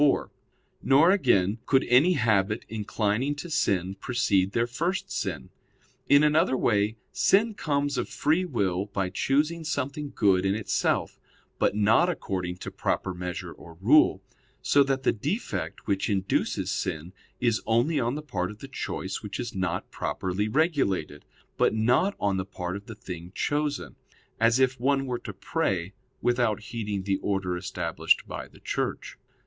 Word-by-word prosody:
4); 145 Hz, -2 st, +3 dB, 0.5 s
nor, 145 Hz, +7 st, +5 dB
again, 100 Hz, -, +2 dB
could 135 Hz, -1 st, +4 dB
any 140 Hz, +9 st, +5 dB
habit 110 Hz, -, +1 dB
inclining 110 Hz, +5 st, -1 dB
to 165 Hz, +4 st, -7 dB
sin 95 Hz, -, +1 dB
precede 100 Hz, -3 st, +1 dB
their 115 Hz, -, +2 dB
first 180 Hz, +10 st, -2 dB
sin. 80 Hz, -10 st, -3 dB, 0.6 s
In 140 Hz, +1 st, +7 dB
another 150 Hz, -2 st, +3 dB
way 105 Hz, -1 st, +1 dB
sin 220 Hz, +3 st, +3 dB
comes 145 Hz, -7 st, -1 dB
of -, -, -3 dB
free 160 Hz, +5 st, +1 dB
will 95 Hz, -, -1 dB
by 95 Hz, -2 st, -2 dB
choosing 155 Hz, -, +1 dB
something 145 Hz, -1 st, -3 dB
good 95 Hz, -3 st, +3 dB
in 95 Hz, +1 st, +1 dB
itself, 110 Hz, -2 st, -1 dB, 0.4 s
but -, -, +2 dB
not 110 Hz, -, +4 dB
according 90 Hz, -, -3 dB
to -, -, -7 dB
proper 95 Hz, -, -1 dB
measure 90 Hz, 0 st, -5 dB
or 85 Hz, 0 st, -13 dB
rule; 100 Hz, -3 st, +4 dB, 0.4 s
so 145 Hz, -, +4 dB
that 135 Hz, -1 st, +1 dB
the -, -, +4 dB
defect 105 Hz, -, -4 dB
which 100 Hz, -1 st, 0 dB
induces 95 Hz, -2 st, 0 dB
sin 80 Hz, +4 st, -3 dB, 0.3 s
is 115 Hz, -3 st, +1 dB
only 120 Hz, +7 st, +2 dB
on 120 Hz, +1 st, 0 dB
the 150 Hz, -, -5 dB
part 95 Hz, -11 st, -2 dB
of 105 Hz, -, -9 dB
the 135 Hz, -, -9 dB
choice 95 Hz, -7 st, -4 dB
which 105 Hz, -2 st, -6 dB
is 120 Hz, -1 st, -4 dB
not 90 Hz, -2 st, -2 dB
properly 95 Hz, +3 st, -2 dB
regulated, 110 Hz, -, 0 dB, 0.3 s
but -, -, +3 dB
not 125 Hz, -, +2 dB
on 100 Hz, -1 st, +1 dB
the 95 Hz, -, -1 dB
part 90 Hz, -1 st, -5 dB
of 100 Hz, 0 st, -8 dB
the 115 Hz, -, -8 dB
thing 90 Hz, -3 st, -8 dB
chosen; 145 Hz, -1 st, -1 dB, 0.4 s
as 115 Hz, +1 st, +4 dB
if 130 Hz, -1 st, +2 dB
one 135 Hz, +2 st, +1 dB
were 125 Hz, -2 st, -3 dB
to -, -, -7 dB
pray, 95 Hz, -, -2 dB, 0.3 s
without 120 Hz, -4 st, +2 dB
heeding 105 Hz, -4 st, -3 dB
the 95 Hz, 0 st, 0 dB
order 95 Hz, -3 st, -1 dB
established 90 Hz, -2 st, 0 dB
by -, -, -6 dB
the -, -, -19 dB
Church. -, -, -3 dB
110 Hz, 160 wpm, -27 LUFS, 95-140 Hz, 0.6 s, In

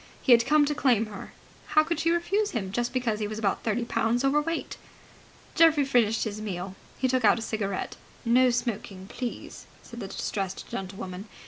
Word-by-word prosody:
He 265 Hz, -, +1 dB
had 235 Hz, 0 st, +6 dB
come 300 Hz, +1 st, +5 dB
to 295 Hz, -, 0 dB
claim 245 Hz, -6 st, +2 dB
her. 210 Hz, -2 st, -9 dB, 0.4 s
How 310 Hz, 0 st, +4 dB
could 335 Hz, 0 st, -2 dB
she 330 Hz, +1 st, +1 dB
refuse 390 Hz, +5 st, +1 dB
him 190 Hz, -3 st, -4 dB
just 240 Hz, +3 st, -1 dB
because 240 Hz, -4 st, -1 dB
he 210 Hz, -, -1 dB
was 215 Hz, +1 st, -5 dB
about 205 Hz, -3 st, 0 dB
thirty 230 Hz, +2 st, -1 dB
pounds 235 Hz, +2 st, 0 dB
overweight? 295 Hz, +4 st, 0 dB, 0.8 s
Geoffrey 320 Hz, -4 st, +5 dB
finished 230 Hz, -5 st, +2 dB
his 215 Hz, -1 st, -4 dB
meal. 190 Hz, -2 st, -5 dB, 0.2 s
He 260 Hz, -, +1 dB
took 255 Hz, -1 st, +1 dB
out 215 Hz, -, +5 dB
a -, -, -4 dB
cigarette. 200 Hz, -4 st, -3 dB, 0.3 s
("No 250 Hz, +2 st, +5 dB
smoking, 225 Hz, -6 st, -3 dB
please!" 245 Hz, +2 st, -6 dB, 0.2 s
said 235 Hz, -, -10 dB
the 200 Hz, -, -5 dB
distressed 195 Hz, -1 st, -4 dB
gentlewoman.) 190 Hz, 0 st, -6 dB
235 Hz, 185 wpm, -27 LUFS, 205-275 Hz, 0.8 s, had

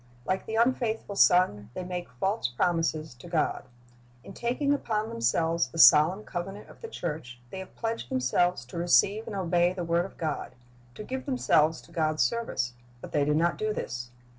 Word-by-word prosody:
Like 185 Hz, 0 st, -2 dB
the 220 Hz, -, -3 dB
unfaithful 230 Hz, -3 st, 0 dB
son, 175 Hz, -, +4 dB
they 185 Hz, -, -4 dB
make 180 Hz, -1 st, -5 dB
false 190 Hz, -, -1 dB
promises 160 Hz, +2 st, -1 dB
to 125 Hz, +7 st, -13 dB
God. 165 Hz, -2 st, -1 dB, 0.6 s
In -, -, -11 dB
taking 255 Hz, +6 st, 0 dB
upon 220 Hz, -6 st, -1 dB
themselves 160 Hz, -, +1 dB
the 125 Hz, -, -11 dB
solemn 160 Hz, +8 st, +7 dB
covenant 195 Hz, +3 st, -6 dB
of -, -, -16 dB
the 455 Hz, -, -6 dB
church 150 Hz, -, -6 dB
they 190 Hz, -, -6 dB
have 190 Hz, -, -10 dB
pledged 225 Hz, -, -3 dB
themselves 130 Hz, +3 st, +1 dB
to 125 Hz, -, -9 dB
receive 195 Hz, +5 st, +3 dB
and 215 Hz, -, -5 dB
obey 175 Hz, -1 st, +2 dB
the 180 Hz, -2 st, -4 dB
word 170 Hz, +1 st, +1 dB
of 195 Hz, -, -12 dB
God, 155 Hz, -5 st, -4 dB, 0.4 s
to -, -, -7 dB
give 260 Hz, +4 st, -5 dB
themselves 160 Hz, -, +2 dB
to -, -, -19 dB
G -, -, -5 dB
od's 155 Hz, -1 st, +2 dB
service, 230 Hz, -, -1 dB, 0.3 s
but -, -, -10 dB
they 145 Hz, -, +2 dB
do 150 Hz, +1 st, +1 dB
not 170 Hz, +2 st, +1 dB
do 215 Hz, 0 st, 0 dB
this. 120 Hz, 0 st, -5 dB
175 Hz, 190 wpm, -28 LUFS, 150-210 Hz, 0.6 s, solemn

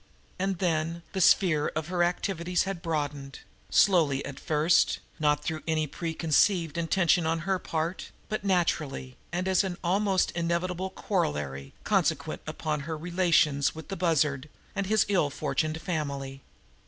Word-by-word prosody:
And 190 Hz, 0 st, 0 dB
then 165 Hz, -1 st, -1 dB
the 190 Hz, -, -1 dB
sphere 165 Hz, -5 st, +4 dB
of 155 Hz, +1 st, -3 dB
her 180 Hz, -1 st, 0 dB
activities 175 Hz, 0 st, 0 dB
had 190 Hz, -2 st, -4 dB
broadened, 145 Hz, -4 st, -3 dB, 0.3 s
slowly 155 Hz, -8 st, +3 dB
at 140 Hz, -1 st, -7 dB
first, 155 Hz, +2 st, +3 dB, 0.2 s
not 150 Hz, -1 st, +2 dB
through 155 Hz, 0 st, -3 dB
any 160 Hz, -1 st, +1 dB
preconceived 165 Hz, +1 st, +1 dB
intention 170 Hz, 0 st, +2 dB
on 165 Hz, 0 st, 0 dB
her 190 Hz, +2 st, 0 dB
part, 165 Hz, +2 st, -3 dB, 0.2 s
but 215 Hz, -2 st, -3 dB
naturally, 155 Hz, -9 st, 0 dB, 0.2 s
and 180 Hz, +2 st, -2 dB
as 190 Hz, +1 st, +3 dB, 0.2 s
almost 190 Hz, +2 st, +2 dB
an -, -, -10 dB
inevitable 180 Hz, +2 st, -1 dB
corollary 75 Hz, -, -2 dB
consequent -, -, 0 dB
upon 155 Hz, -1 st, -2 dB
her 155 Hz, +2 st, -4 dB
relations 160 Hz, -4 st, +2 dB
with 160 Hz, +2 st, -9 dB
the 195 Hz, -, -3 dB
Bussard 155 Hz, -5 st, +1 dB, 0.3 s
and 195 Hz, -1 st, -1 dB
his 215 Hz, 0 st, +3 dB
ill 185 Hz, -8 st, +2 dB
fortuned 155 Hz, +2 st, -2 dB
family. 140 Hz, -5 st, -4 dB
165 Hz, 140 wpm, -28 LUFS, 150-180 Hz, 0.3 s, sphere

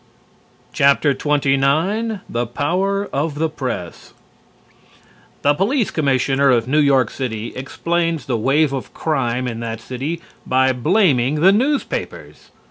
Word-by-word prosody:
XXIX 145 Hz, -, +1 dB
THE 120 Hz, 0 st, -2 dB
POWER 185 Hz, -, -1 dB
OF 145 Hz, +2 st, -1 dB
THE 160 Hz, +2 st, 0 dB
PRESS 125 Hz, -, -6 dB, 1.3 s
The 145 Hz, -, +4 dB
Police 215 Hz, -, 0 dB
Commissioner 140 Hz, -1 st, +1 dB
of 120 Hz, -2 st, +2 dB
New 150 Hz, +4 st, +2 dB
York 135 Hz, -5 st, +3 dB
City 115 Hz, -4 st, -5 dB
explains 165 Hz, +4 st, -2 dB
the 130 Hz, -4 st, -1 dB
wave 140 Hz, +6 st, +2 dB
of 135 Hz, -, -6 dB
crime 130 Hz, -5 st, -1 dB
in 115 Hz, -2 st, -4 dB
that 115 Hz, -1 st, -5 dB
city 135 Hz, +8 st, -5 dB, 0.2 s
by 130 Hz, +1 st, +2 dB
blaming 145 Hz, -, +2 dB
the 190 Hz, +3 st, +7 dB
newspapers. 270 Hz, +8 st, -2 dB
140 Hz, 120 wpm, -19 LUFS, 130-165 Hz, 1.3 s, the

